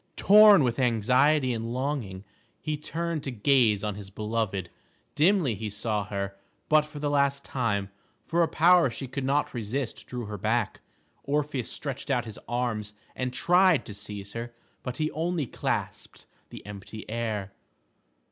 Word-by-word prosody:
Tom 205 -4 +8
with 125 0 0
anxiety 125 +4 +3
and 115 0 -4
longing, 130 -9 -3 0.4
he 155 - -2
turned 165 +1 -3
to - - -3
gaze 115 -3 +3
on 105 -1 -1
his 100 -1 -9
beloved. 105 -3 -2 0.4
Dimly 165 - +3
he 105 +1 -4
saw 105 0 -2
her, 100 -1 -4 0.3
but 155 0 +4
for 150 - -11
the 145 0 -2
last 140 -1 +1
time, 100 -6 -1 0.3
for 170 +1 +1
a 165 - +4
power 170 -2 +5
she 120 +3 -6
could 135 +2 -4
not 140 +2 +1
resist 120 +2 -4
drew 125 -2 -5
her 105 -1 -6
back. 110 +2 0 0.4
Orpheus 145 -3 -1
stretched 140 0 -5
out 125 -3 +1
his 110 -2 -9
arms 110 -4 -2 0.2
and 130 -1 -2
tried 180 +4 +4
to 105 - -7
seize 100 0 -7
her, 115 0 -6 0.3
but 125 -1 -5
he 155 0 -1
only 165 -1 -1
clasped - - -4 0.2
the - - -11
empty 105 +1 -9
air. 110 -3 -3
125 Hz, 155 wpm, -27 LUFS, 105-145 Hz, 0.4 s, Tom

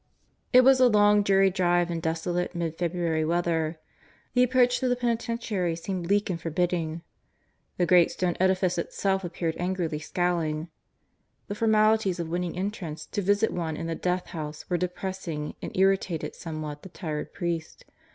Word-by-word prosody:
It 255 - +8
was 265 0 +6
a 255 - +7
long, 210 -2 +5
dreary 195 -1 +4
drive 175 -2 +2
in 170 - -2
desolate 170 +2 -2
mid 165 -2 -2
February 170 -2 -1
weather. 165 -1 0 0.5
The 250 - +4
approach 250 0 +3
to 260 - 0
the 245 - +2
penitentiary 230 -7 -1
seemed 175 +1 -4
bleak 205 +2 +2
and 175 -3 -3
forbidding. 165 -1 -1 0.7
The 180 - +2
great 175 -1 +5
stone 180 -2 -1
edifice 185 -1 +2
itself 190 +2 -1
appeared 165 -1 -2
angrily 175 -4 -1
scowling. 165 -1 -1 0.8
The - - -2
formalities 215 -3 +3
of 165 -1 -3
winning 175 0 -2
entrance 185 -5 -4
to 205 - -1
visit 205 +3 +2
one 160 -3 -3
in - - -4
the 165 - -2
Death 180 +2 -1
House 155 -2 -6
were - - +3
depressing 180 -4 -4
and - - -5
irritated 190 -3 +1
somewhat 155 -2 -6
the 190 - -11
tired 155 -4 -5
priest. 170 -3 -4
180 Hz, 160 wpm, -27 LUFS, 165-195 Hz, 0.8 s, It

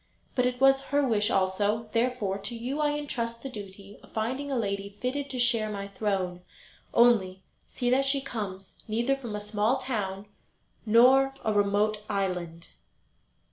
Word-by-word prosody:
But 250 -1 +2
it 250 0 -3
was 270 0 +5
her 285 -1 +2
wish 210 -3 +2
also; 205 +4 +1
therefore, 230 -5 0
to 235 +4 -4
you 250 +6 -4
I 295 -1 +1
entrust 235 -5 -4
the 270 - -5
duty 200 -2 -10
of - - -18
finding 260 +6 -2
a - - 0
lady 200 -2 -3
fitted 275 +3 -2
to 260 - -5
share 240 -3 +2
my 200 -1 -5
throne; 190 -4 -2 0.5
only, 195 -6 +3 0.2
see 245 -1 -1
that 270 +2 +3
she 275 +1 +2
comes 205 -8 -6
neither 235 +5 +1
from 240 -6 -6
a - - -3
small 210 +4 0
town 205 -7 -3 0.6
nor 265 +5 +6
a 215 - +2
remote 205 +1 +2
island." 180 -5 -3
220 Hz, 160 wpm, -28 LUFS, 200-255 Hz, 0.6 s, nor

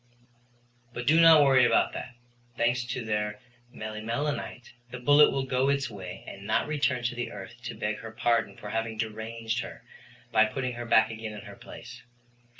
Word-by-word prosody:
But 120 - -4
do 160 +5 +5
not 160 -2 +8
worry 135 -2 +5
about 120 - +3
that. 125 - -7 0.4
Thanks 120 +1 +1
to 120 0 -4
their 105 -1 -2 0.3
melimelonite, 115 +5 -4 0.2
the 125 - -7
bullet 145 +4 +6
will 135 - -1
go 130 +1 +1
its 140 -4 0
way 95 -2 -8
and 100 +1 -9
not 110 - +2
return 140 -4 0
to 120 - -1
the 120 0 -4
earth 105 +4 -10
to - - -5
beg 105 0 -2
her 115 - -8
pardon 110 -3 0
for 105 - -8
having 115 0 -2
deranged 110 +1 -3
her 115 - -7 0.5
by 110 -1 +5
putting 125 +3 -3
her 120 0 -6
back 110 -1 +4
again 110 -1 -6
in 105 - -8
her - - -11
place. 120 0 -11
120 Hz, 180 wpm, -28 LUFS, 110-125 Hz, 0.5 s, not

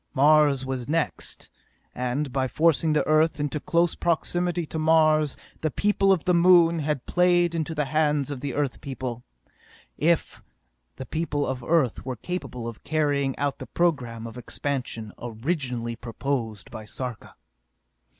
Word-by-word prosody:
Mars 145 -1 +4
was 130 -1 -4
next, 165 0 -2 0.4
and 125 +2 -2
by 130 -1 +1
forcing 160 +2 +2
the 150 - +2
Earth 155 0 +3
into 145 +1 -1
close 170 +2 +1
proximity 175 +1 0
to 160 - -5
Mars 155 -2 +3 0.2
the 155 - 0
people 200 +3 +2
of 185 -5 +2
the 180 - +2
Moon 170 -1 +5
had 150 -3 -2
played 175 -1 +3
into 160 0 -2
the 150 -1 0
hands 150 0 +1
of 135 -2 -6
Earth 140 -1 -2
people 130 -3 -5 0.8
if 165 +1 +1 0.5
the 130 - -7
people 150 -2 -1
of 130 -2 -4
Earth 155 -5 +1
were 130 -1 -4
capable 125 -4 -5
of 115 -2 -8
carrying 145 -4 0
out 140 -1 -1
the - - -7
program 125 -10 -1
of 115 +1 -8
expansion 125 -4 -4
originally 120 -1 -2
proposed 115 -3 -4
by 110 - -7
Sarka! 125 +2 -7
145 Hz, 145 wpm, -25 LUFS, 125-165 Hz, 0.8 s, Moon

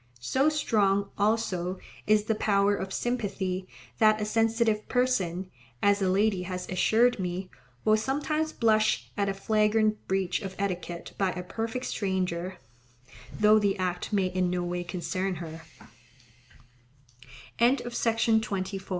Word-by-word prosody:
So 265 - +2
strong, 200 -9 +1
also, 195 -4 0 0.3
is 210 0 +4
the 220 - 0
power 205 -1 +2
of 190 -1 -5
sympathy 195 -6 -2 0.3
that 215 -1 +5
a 210 - -1
sensitive 225 0 +1
person, 190 -8 0 0.3
as 205 0 +4
a 190 - +2
lady 195 0 +2
has 180 0 -5
assured 225 +6 +3
me, 185 0 -4 0.3
will 215 0 +5
sometimes 300 +6 -1
blush 220 -3 +2
at 200 -1 0
a - - 0
flagrant 215 +1 +1
breach 190 0 0
of 190 -2 -6
etiquette 180 -3 -4
by 195 -2 +1
a 180 - -5
perfect 225 +6 -4
stranger, 185 -2 -2 0.8
though 215 0 +6
the 200 -2 +1
act 180 0 -2
may 200 -3 +2
in 185 0 0
no 180 0 -1
way 175 0 -3
concern 180 +2 -3
her. 160 -1 -7 2.0
Modesty. 225 -5 +1
200 Hz, 130 wpm, -28 LUFS, 185-220 Hz, 2.0 s, though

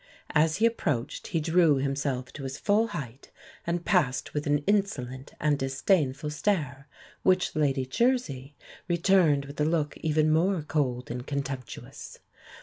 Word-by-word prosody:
As 155 +1 +3
he 220 - +2
approached 150 - -1
he 165 - -1
drew 165 -1 +4
himself 135 -1 -2
to 145 - -8
his 135 0 -5
full 215 +2 +2
height, 135 - -7 0.4
and 170 0 -1
passed 145 -9 +1
with 150 0 -2
an 145 0 +1
insolent 140 -11 -1
and 150 -2 +1
disdainful 135 +1 0
stare, 150 -5 -1 0.3
which 185 -2 +2
Lady 140 -3 +1
Jersey 145 - 0 0.3
returned 170 -5 +3
with 140 +1 -6
a - - +3
look 155 -2 0
even 155 -1 +1
more 175 +1 +2
cold 130 -6 -1
and 125 +2 -5
contemptuous. 135 -3 -6
150 Hz, 145 wpm, -27 LUFS, 135-170 Hz, 0.4 s, drew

